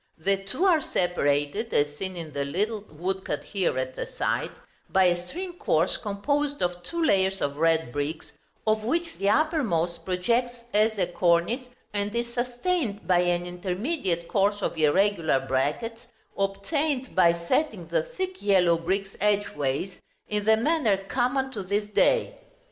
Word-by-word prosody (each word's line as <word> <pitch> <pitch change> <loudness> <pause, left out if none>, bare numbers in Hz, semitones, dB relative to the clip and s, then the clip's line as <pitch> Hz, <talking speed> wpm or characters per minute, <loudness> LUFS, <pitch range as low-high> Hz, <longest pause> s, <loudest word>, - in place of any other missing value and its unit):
The 195 +5 +1
two 320 - -1
are 340 -5 +5
separated, 175 - 0
as 145 0 +2
seen 185 +3 -5
in 160 -3 -7
the 140 0 -1
little 205 +9 -1
woodcut 190 +5 -3
here 195 -8 -1
at 130 0 -2
the - - -4
side, - - -1 0.4
by 190 - +4
a 175 0 +2
string 360 - -5
course 165 +4 +2
composed 285 +7 -1
of 175 0 -1
two 335 - -3
layers 195 -7 +2
of 140 0 -2
red 160 -4 +2
bricks, 145 +4 -4 0.3
of 215 0 +2
which 330 +8 -1
the 195 +1 +2
uppermost 195 - +1
projects 235 +7 0
as 215 +1 +3
a 185 - +2
cornice, 175 +8 +1 0.2
and 205 +1 -2
is 235 0 -2
sustained 245 - -1
by 180 -1 +4
an 175 0 +1
intermediate 180 - -2
course 205 0 +1
of - - -1
irregular 160 -1 +3
brackets, 150 - -2 0.3
obtained 255 +8 -1
by 170 -2 +6
setting 310 - +1
the - - +2
thick 375 -7 -5
yellow 180 -4 +4
bricks 195 +3 -2
edgeways, 190 -6 0 0.3
in 210 -1 -2
the 220 0 +5
manner 240 -5 +2
common 255 +6 -1
to 215 -6 -4
this 200 +3 -1
day. 475 - +2
195 Hz, 155 wpm, -26 LUFS, 175-240 Hz, 0.4 s, by